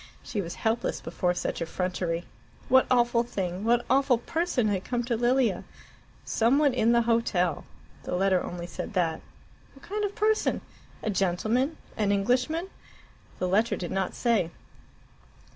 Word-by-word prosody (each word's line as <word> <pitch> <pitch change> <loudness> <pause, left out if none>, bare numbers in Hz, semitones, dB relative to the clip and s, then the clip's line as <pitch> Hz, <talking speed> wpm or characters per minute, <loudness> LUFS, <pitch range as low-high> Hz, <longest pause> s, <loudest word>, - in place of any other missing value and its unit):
She 205 - -3
was 170 -2 -6
helpless 225 +1 -1
before 175 +1 -1
such 175 - -3
effrontery. 175 0 -2 0.4
What 260 +1 +5
awful 240 -1 +3
thing 190 -5 -3
what 240 +2 +2
awful 270 -2 +3
person 275 -2 0
had 195 -3 0
come 245 -1 -1
to 235 0 -1
Lilia? 240 -4 +2 0.6
"Some 235 +4 +3
one 290 -3 +3
in 235 -2 +3
the 235 0 +4
hotel." 210 -8 +1 0.4
The - - -3
letter 190 0 +2
only 175 -1 -5
said 175 - -6
that. 165 -4 0 0.5
What 275 - -17
kind 420 +2 -2
of 405 -1 -2
person? 435 +1 +1 0.4
A 215 - 0
gentleman? 215 - 0 0.2
An 205 -2 +2
Englishman? 250 - +1 0.7
The 185 - -1
letter 210 +5 +2
did 175 - -5
not 190 -1 -1
say. 225 -9 +1
225 Hz, 150 wpm, -27 LUFS, 180-250 Hz, 0.7 s, What